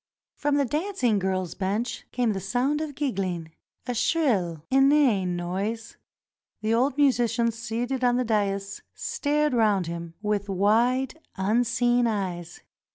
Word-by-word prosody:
From 290 0 0
the 285 -1 +2
dancing 295 - 0
girls' 185 -2 -1
bench 205 +5 -3
came 240 -3 +1
the 195 - -3
sound 250 - 0
of 300 -3 -5
giggling 185 - -2 0.2
— - - -49
a 245 - -2
shrill, 220 - +1
inane 265 -9 +4
noise. 200 +6 -3 0.7
The 220 +1 0
old 255 +4 +1
musician 240 -4 +2
seated 240 +3 -3
on 245 -1 +4
the 250 - 0
dais 200 -3 -1
stared 300 0 0
round 210 -6 +3
him 170 0 -6
with 210 -1 -2
wide, 235 - +2 0.2
unseeing 240 +4 +2
eyes. 180 -6 -3
230 Hz, 135 wpm, -26 LUFS, 195-255 Hz, 0.7 s, inane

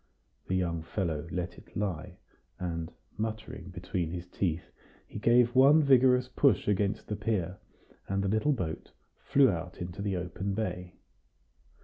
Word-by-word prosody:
The 95 - 0
young 85 -3 0
fellow 80 -2 -2
let 90 0 -4
it - - -12
lie, 95 -6 -3 0.4
and, 85 -2 -4 0.3
muttering 110 -5 -4
between 90 -1 -3
his 85 +1 -5
teeth, 90 -2 -2 0.3
he - - -8
gave 120 +2 +4
one 140 +4 +7
vigorous 125 -2 +5
push 140 +1 +2
against 100 0 0
the 105 - -2
pier, 95 -4 -2 0.5
and 100 0 0
the - - 0
little 110 +9 +2
boat 85 - -4 0.3
flew 135 -4 +4
out 85 +1 -5
into 90 +1 -5
the 100 -2 -1
open 95 +3 -3
bay. 90 -4 -3
95 Hz, 145 wpm, -30 LUFS, 90-110 Hz, 0.5 s, one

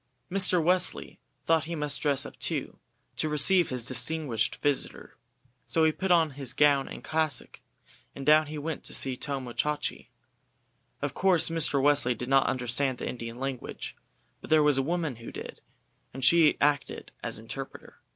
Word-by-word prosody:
Mr. 185 -2 +3
Wesley 180 +2 +1 0.3
thought 160 -2 +2
he 170 +1 -5
must 150 -2 -2
dress 140 -2 +2
up - - -10
too, - - -3 0.4
to 155 - -1
receive 150 +4 +4
his 125 -3 -3
distinguished 130 -1 0
visitor, 145 -2 -2 0.5
so 165 - +1
he 160 - +4
put 190 +4 -4
on 165 -3 +3
his 135 -2 -4
gown 140 0 +3
and - - -9
cassock, 155 -3 -1 0.6
and 135 - -7
down 155 +1 +5
he 155 +1 -7
went 155 +1 -5
to - - -1
see 130 -1 +3
Tomo 130 -2 -5
Chachi. 150 -1 -2 1.0
Of - - -2
course 185 -4 +3
Mr. 160 -4 +1
Wesley 140 -3 +4
did 125 +3 -6
not 135 0 +4
understand 130 +1 -1
the - - -5
Indian 115 -1 -6
language, 135 -1 -6 0.5
but - - -11
there 155 -1 +4
was 145 -2 +3
a - - +3
woman 160 -3 -2
who 115 - -10
did, - - -9 0.5
and 135 -1 -2
she 165 +1 +5
acted 145 -1 -1
as - - -3
interpreter. - - -9
145 Hz, 170 wpm, -27 LUFS, 135-160 Hz, 1.0 s, down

